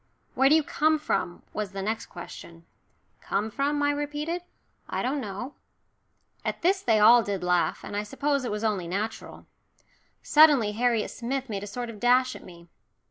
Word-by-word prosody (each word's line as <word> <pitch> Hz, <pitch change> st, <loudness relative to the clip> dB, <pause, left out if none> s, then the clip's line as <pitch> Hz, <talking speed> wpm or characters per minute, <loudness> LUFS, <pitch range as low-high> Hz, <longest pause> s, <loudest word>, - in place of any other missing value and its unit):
"Where 270 Hz, +1 st, +4 dB
do 305 Hz, -, +6 dB
you 320 Hz, -, +3 dB
come 310 Hz, +2 st, +2 dB
from?" 175 Hz, -11 st, -2 dB
was 210 Hz, -2 st, -4 dB
the 195 Hz, 0 st, -4 dB
next 220 Hz, +2 st, -3 dB
question. 170 Hz, -1 st, -11 dB, 0.6 s
"Come 215 Hz, +2 st, -2 dB
from?" 290 Hz, +4 st, 0 dB
I 290 Hz, -, +3 dB
repeated. 295 Hz, +4 st, -3 dB, 0.5 s
"I -, -, -2 dB
don't 270 Hz, +3 st, -1 dB
know." 215 Hz, +6 st, -6 dB, 0.9 s
At -, -, -4 dB
this 380 Hz, +2 st, +3 dB
they 225 Hz, -2 st, +3 dB
all 235 Hz, +3 st, +7 dB
did 200 Hz, -4 st, -3 dB
laugh, 180 Hz, -1 st, +1 dB
and -, -, -7 dB
I 205 Hz, -, 0 dB
suppose 280 Hz, +6 st, -1 dB
it 245 Hz, -, -3 dB
was 210 Hz, +1 st, -3 dB
only 205 Hz, -6 st, -1 dB
natural. 210 Hz, +5 st, -5 dB, 0.8 s
Suddenly 295 Hz, -9 st, +5 dB
Harriet 230 Hz, 0 st, 0 dB
Smith 260 Hz, +2 st, -4 dB
made 200 Hz, -2 st, -3 dB
a 205 Hz, -, -6 dB
sort 240 Hz, +3 st, -5 dB
of 215 Hz, -, -12 dB
dash 250 Hz, +2 st, +3 dB
at -, -, -11 dB
me. 170 Hz, -1 st, -14 dB
235 Hz, 180 wpm, -27 LUFS, 205-285 Hz, 0.9 s, all